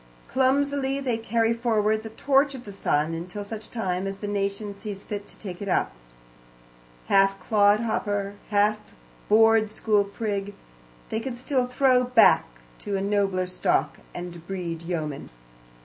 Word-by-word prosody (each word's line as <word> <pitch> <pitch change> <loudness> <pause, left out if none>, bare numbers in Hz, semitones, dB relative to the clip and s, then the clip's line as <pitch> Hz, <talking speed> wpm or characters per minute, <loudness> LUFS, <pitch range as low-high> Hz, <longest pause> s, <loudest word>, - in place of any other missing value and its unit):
Clumsily 275 +1 +1
they 250 -5 -1
carry 230 0 +1
forward 220 -2 +1
the 220 - -7
torch 275 +4 +2
of 250 - -9
the 205 - -9
sun, 155 -4 0
until 180 +5 -5
such 215 +1 -7
time 190 -4 -2
as 195 0 -4
the 205 - -5
nation 200 0 -2
sees 200 -1 -7
fit 205 -1 -6
to - - -12
take 185 -3 -8
it 200 - -4
up. 185 - +1 1.1
Half 195 0 +3
clodhopper, 205 -1 +1 0.2
half 210 +1 +3 0.5
board 225 0 +5
school 210 -1 +1
prig, 200 -1 -4 0.5
they 220 - -1
can 240 +1 -5
still 255 0 0
throw 250 0 +3
back 250 -2 +5 0.3
to 200 -1 -3
a - - -2
nobler 200 -2 +1
stock, 150 -5 0
and 175 -1 -8
breed 175 -4 -4
yeomen. 160 -5 -4
205 Hz, 150 wpm, -25 LUFS, 195-230 Hz, 1.1 s, board